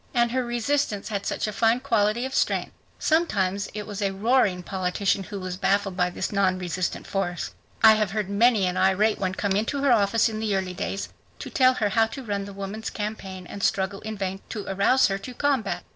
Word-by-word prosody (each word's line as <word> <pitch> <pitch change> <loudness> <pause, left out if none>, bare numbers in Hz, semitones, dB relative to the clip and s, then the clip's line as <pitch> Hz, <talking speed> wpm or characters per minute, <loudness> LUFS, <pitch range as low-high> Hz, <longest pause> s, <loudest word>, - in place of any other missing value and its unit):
And 240 -1 +3
her 255 +1 0
resistance 240 -2 -1
had 200 -2 -3
such - - -1
a 215 - -3
fine 225 +3 +3
quality 230 -2 +1
of 265 - -5
strength. - - 0 0.3
Sometimes 205 - +1
it 210 -1 -4
was 205 -1 -6
a 200 - +2
roaring 195 -2 +2
politician 190 +1 0
who 200 - -6
was 185 -1 -5
baffled 195 0 +1
by 180 -1 +1
this 180 - -4
non 195 -2 +2
resistant 180 0 -3
force. 180 -3 -3 0.3
I 220 -1 +10
have 215 -2 +1
heard 210 0 -2
many 210 0 +3
an 180 0 -1
irate 205 +3 +3
one 190 -1 -1
come 200 0 -1
into 225 +8 0
her 280 - +4
office 220 +1 +3
in 215 -1 -4
the 215 -2 0
early 185 -1 -2
days 195 +2 -4 0.3
to - - -8
tell 255 -1 +4
her 215 -4 +1
how 225 +2 +3
to 270 +4 -8
run 200 -3 -3
the 200 - -8
woman's 200 +3 -5
campaign, 195 -3 -5
and 200 - -8
struggle 195 0 0
in 220 0 -5
vain 195 0 -3
to 210 -3 -5
arouse 200 +7 +3
her 195 0 0
to 245 +5 -9
combat. 275 -5 0
205 Hz, 215 wpm, -25 LUFS, 195-225 Hz, 0.3 s, I